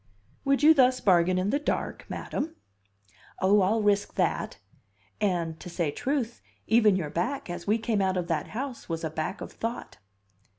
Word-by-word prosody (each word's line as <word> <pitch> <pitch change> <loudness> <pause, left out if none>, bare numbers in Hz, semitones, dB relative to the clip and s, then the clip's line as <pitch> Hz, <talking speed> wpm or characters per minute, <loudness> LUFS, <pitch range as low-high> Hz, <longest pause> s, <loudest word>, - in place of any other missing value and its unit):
"Would 275 +1 +2
you 315 +1 +9
thus 255 -3 +4
bargain 180 -1 +3
in 185 +3 0
the 285 - +1
dark, 295 - -3
madam?" 320 +3 -4 0.8
"Oh, 200 +2 +4
I'll 210 +4 +2
risk 205 -1 +1
that; - - 0 0.6
and, 170 -6 -1
to - - -8
say 170 -3 -1
truth, 255 - -2 0.2
even 220 -3 +5
your 160 -6 -2
back, 185 +4 -2
as 175 0 -7
we 215 +2 +3
came 225 -2 0
out 190 -1 +1
of 180 - -1
that 160 -3 -1
house, 255 -1 -6
was 165 0 -3
a 160 - -2
back 155 +6 -3
of - - -6
thought." 230 +2 -5
205 Hz, 175 wpm, -27 LUFS, 175-240 Hz, 0.8 s, you